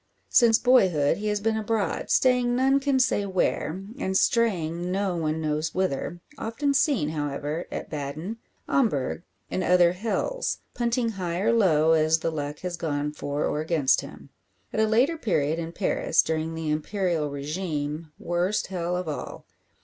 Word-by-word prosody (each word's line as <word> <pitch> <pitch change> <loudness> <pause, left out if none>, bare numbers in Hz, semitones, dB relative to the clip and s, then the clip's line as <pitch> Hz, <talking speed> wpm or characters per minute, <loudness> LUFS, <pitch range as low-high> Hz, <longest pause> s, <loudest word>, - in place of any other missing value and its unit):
Since 230 -3 +5
boyhood 190 - +3
he 215 - -3
has 210 0 0
been 220 +1 +1
abroad, 220 -1 -1
staying 250 -1 +3
none 270 +2 +3
can 275 -1 +1
say 225 -5 +2
where, 185 -1 -1 0.2
and 190 -7 0
straying 175 -8 +1
no 195 -1 0
one 160 -1 -1
knows 155 0 -2
whither 175 -1 -2 0.2
often 280 +6 -1
seen, 265 - +2
however, 150 +1 -3
at - - -6
Baden, 155 +8 -4 0.3
Homburg, 170 - +1 0.3
and 185 - -1
other 175 -1 +5
"hells," 225 - -2 0.2
punting 235 0 0
high 180 -5 -3
or 225 +4 +2
low, 160 -8 +4
as 160 0 +4
the 165 0 -2
luck 150 -1 -5
has 180 -2 -4
gone 150 -3 -2
for 145 0 -3
or 150 - -1
against 155 -4 +2
him. - - -12 0.4
At - - -1
a 220 - +4
later 260 +10 +2
period 160 - 0
in 165 0 -4
Paris, 185 +3 +1
during 160 0 -2
the 160 -1 -2
Imperial 165 -1 -1
regime 150 +1 -4
worst 175 +4 0
hell 175 0 -1
of 180 -2 -4
all. 150 - -6
175 Hz, 160 wpm, -26 LUFS, 155-220 Hz, 0.4 s, Since